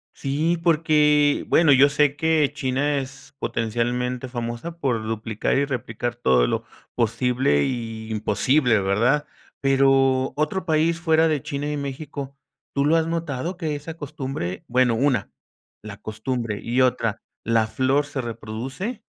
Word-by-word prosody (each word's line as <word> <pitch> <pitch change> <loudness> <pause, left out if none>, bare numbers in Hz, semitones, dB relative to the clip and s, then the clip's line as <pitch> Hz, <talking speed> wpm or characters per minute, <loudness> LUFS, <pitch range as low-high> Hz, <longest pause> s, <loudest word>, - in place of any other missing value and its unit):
Sí, 155 +5 0
porque 150 -3 +3
bueno, 160 -3 +5
yo 135 +1 +7
sé 145 -1 +2
que 160 -2 +2
China 140 +1 0
es 135 +1 -7
potencialmente 120 +2 -2
famosa 120 +7 -5
por 125 -8 -1
duplicar 110 -1 -2
y 140 - +2
replicar 120 -3 -4
todo 65 - +3
lo - - -1 0.3
posible 125 - +1
y 115 -3 -4
imposible, 110 +3 +2
¿verdad? 120 +10 +2 0.4
Pero, 135 -1 +3
otro 155 +5 -1
país 165 +1 +2
fuera 160 -1 +3
de 150 -3 0
China 145 -1 -3
y 150 - -2
México, 140 0 -6 0.4
¿tú 140 0 +1
lo 160 +2 +4
has 165 0 +2
notado, 165 0 -3
que 155 -4 -2
esa 150 +3 -7
costumbre? 135 - -5
Bueno, 125 -1 +3
una 125 -5 +1 0.5
la 105 -2 -8
costumbre, 110 0 -3
y 120 +3 0
otra, 115 -4 +1 0.2
¿la 115 -1 +3
flor 130 +5 +1
se 140 - -5
reproduce? 125 - -5
135 Hz, 140 wpm, -23 LUFS, 115-150 Hz, 0.5 s, yo